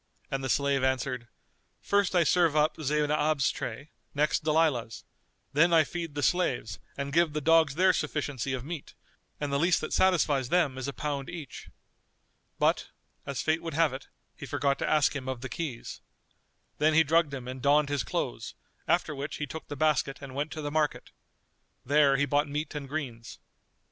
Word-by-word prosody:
and 135 0 -2
the 130 - -2
slave 140 -1 +1
answered, 130 -2 -1 0.5
"First 200 -2 +1
I 175 - +5
serve 165 -1 +3
up 150 +1 +3
Zaynab's 150 -1 +1
tray, 130 +6 -6 0.2
next 150 +2 +1
Dalilah's; 150 -7 +1 0.5
then 165 +5 +4
I 165 -2 +6
feed 165 -1 -6
the 145 - -2
slaves 130 - 0 0.2
and 140 0 -4
give 165 -1 +3
the 150 - -1
dogs 160 -2 +4
their 185 +2 +4
sufficiency 145 -5 -2
of 130 -1 -4
meat, 160 -2 -7 0.4
and 145 -1 -3
the 140 - +2
least 175 +2 +3
that 155 - -4
satisfies 150 -8 +2
them 170 -7 +2
is 130 - -4
a - - -2
pound 140 0 -4
each." 160 -8 -8 0.9
But, - - +1 0.4
as 140 -3 -3
fate 160 +1 +1
would 165 -3 -5
have 160 -3 +3
it, 135 - -8 0.3
he - - -9
forgot 140 -1 0
to - - -1
ask 150 -1 +3
him 130 -2 -4
of 130 -2 -4
the 130 - -5
keys. 145 -9 -5 0.8
Then 155 +1 +3
he 160 - +7
drugged 160 0 +2
him 130 -3 -6
and 130 0 -6
donned 145 +1 +3
his 145 -4 0
clothes; - - -4 0.3
after 155 - +1
which 140 +1 -5
he 150 - -3
took 155 +3 -8
the 145 - -6
basket 145 -2 +1
and 135 -2 -9
went 145 +3 -3
to 155 - -6
the 145 - -3
market. 155 -1 -1 0.7
There 140 0 +4
he 145 - +2
bought 145 +2 +1
meat 150 +2 -4
and 145 -3 -6
greens. 125 -7 -5
145 Hz, 185 wpm, -28 LUFS, 135-155 Hz, 0.9 s, he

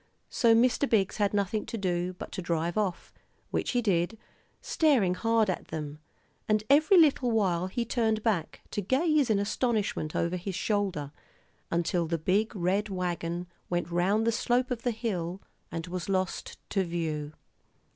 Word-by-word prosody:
So 230 -3 +4
Mr. 250 +4 +3
Biggs 200 -4 +2
had 205 -2 +2
nothing 205 +1 0
to 230 - -4
do 180 -2 -1
but 180 - -9
to - - -4
drive 170 -1 -1
off, 200 -5 -2 0.4
which - - -1
he 245 -1 +1
did, 185 +1 +1 0.4
staring 260 - +2
hard 225 +3 +2
at 185 - -2
them; 150 -2 -5 0.5
and 215 0 +3
every 310 +6 +6
little 285 -6 +5
while 185 -6 +1
he 235 +5 -2
turned 220 -2 0
back, 195 -9 -1
to 205 - -1
gaze 285 - +2
in 215 - +3
astonishment 205 -6 -1
over 170 +2 0
his 185 +1 -5
shoulder, 190 -10 -1 0.6
until 170 0 0
the 165 +1 0
big 200 +8 +1
red 195 +3 0
wagon 175 -2 -2 0.2
went 175 -1 -1
round 195 +6 +2
the 230 - +3
slope 245 +2 +1
of 240 -2 -2
the 245 - 0
hill 195 -6 -3 0.3
and 165 -1 -4
was 180 +1 -5
lost 185 -1 -2
to 195 - +2
view. 160 -4 -3
195 Hz, 165 wpm, -29 LUFS, 175-225 Hz, 0.6 s, every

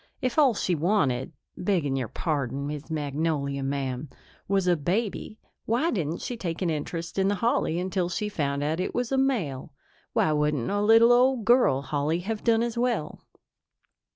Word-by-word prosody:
If 255 +4 0
all 270 -6 +5
she 185 - 0
wanted 155 -7 +1 0.2
begging 175 -8 0
your 130 -3 -2
pardon, 140 - -2
Miss 150 +1 -6
Magnolia, 145 -2 -1
ma'am 135 0 -3 0.4
was 195 -1 +1
a 180 -1 +4
baby, 200 +7 -2 0.3
why 245 +10 +1
didn't 165 -5 -2
she 245 - -3
take 175 -4 -3
an 170 - +1
interest 165 +4 -4
in 190 - +3
the 205 - +1
holly 200 -5 0
until 180 0 -1
she 210 +4 -2
found 145 -7 -2
out 155 +3 -1
it 185 - -2
was 245 0 -1
a 270 - +1
male? 180 - -1 0.4
Why 155 - +2
wouldn't 150 -3 0
a 205 0 0
little 225 +3 +6
old 250 -2 +3
girl 240 - +4
holly 145 +4 -1
have 215 +3 -4
done 230 -1 +3
as 235 0 -2
well?" 240 -10 -1
175 Hz, 175 wpm, -26 LUFS, 145-220 Hz, 0.4 s, little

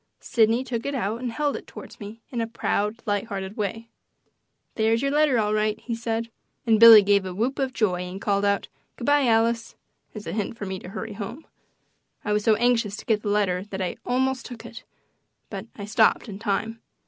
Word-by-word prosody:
Sidney 230 +2 +2
took 240 -1 -4
it 280 - -2
out 225 -1 -2
and 250 -2 -3
held 290 +4 -1
it - - -8
toward - - -11
me 215 +2 -9
in 240 -3 -2
a 225 - -1
proud, 220 -1 -2
light 205 -1 0
hearted 195 -2 -5
way: 225 +1 -3 0.9
"There's 225 +2 +1
your 275 - +1
letter, 295 -3 +3
all 210 -1 +1
right," 215 0 0
he 235 - -5
said, 230 0 -3 0.3
and 225 -2 +4
Billy 225 -2 +11
gave 200 0 +3
a 185 -1 -6
whoop 245 +8 -1
of 265 -1 0
joy 190 -7 0
and 180 +1 -6
called 200 0 0
out, 200 0 +1 0.3
"Good 235 - -7
bye, 285 -2 +4
Alice," 230 0 +1 0.4
as 210 - -7
a - - -4
hint 215 +2 -3
for 205 - -5
me 190 -1 -4
to 180 - -10
hurry 215 +2 -6
home. 220 +9 -7 0.8
I 210 - +1
was 210 0 +1
so 220 0 +4
anxious 230 -3 +1
to - - -10
get 215 -2 +1
the 210 - -3
letter 195 -3 +1
that 195 -2 -6
I 185 -2 -2
almost 255 0 0
took 245 -2 -10
it, - - -10 0.7
but - - -6
I 200 - -6
stopped 220 +3 +3
in 200 -2 -7
time. 225 +1 -2
220 Hz, 215 wpm, -25 LUFS, 205-235 Hz, 0.9 s, Billy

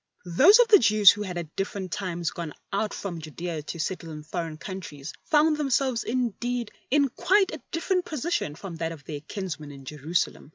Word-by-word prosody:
Those 275 - +7
of 485 -1 +5
the 420 - +9
Jews 215 -4 +7
who 210 - -5
had 185 -4 -4
at 160 -3 -6
different 195 -2 -3
times 175 -3 -2
gone 165 -3 -6 0.2
out 205 +1 0
from 175 -5 -5
Judea 160 +1 -5
to 165 +3 -7
settle 170 0 -3
in 150 -1 -8
foreign 160 0 -4
countries 165 -6 -7
found 305 -1 +4
themselves 270 -4 +1
indeed 245 -1 -2 0.2
in 285 +1 +4
quite 390 - +2
a - - -6
different 360 +2 0
position 310 - -2
from 170 0 -8
that 165 0 -2
of 150 -4 -12
their 145 -1 -6
kinsmen 160 -3 -6
in 135 -1 -12
Jerusalem. 150 +2 -2
190 Hz, 190 wpm, -26 LUFS, 160-250 Hz, 0.2 s, the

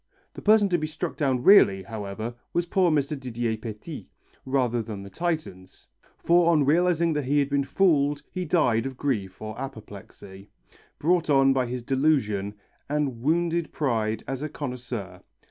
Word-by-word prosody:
The - - -9
person 210 -1 +5
to 175 -1 +1
be 155 - -2
struck 160 +2 -5
down 130 -4 0
really, 100 - +6
however, 110 +2 -6 0.2
was 175 - +1
poor 180 0 +2
Mr. 150 -1 0
Didier 120 -3 -2
Petit, 110 -1 -8 0.4
rather 125 -3 +1
than 105 -3 -7
the 100 - -11
Titans, 155 - -4 0.3
for 170 0 +3
on 150 -4 +3
realizing 170 +2 +2
that 150 -2 -2
he 145 +3 +1
had 140 -1 +1
been 140 0 +2
fooled 145 -3 +2
he 185 - -3
died 135 -8 +2
of 130 -1 -8
grief 105 -10 -2
or 110 +3 -6
apoplexy, 100 -5 -10 0.5
brought 170 +1 +1
on 135 -1 +5
by 130 -2 0
his 125 0 -5
disillusion, 125 -7 0 0.3
and 140 -5 -1
wounded 170 +3 0
pride 110 -6 -1
as 135 0 -4
a 155 - -3
connoisseur. 125 -8 -6
135 Hz, 165 wpm, -25 LUFS, 110-155 Hz, 0.5 s, really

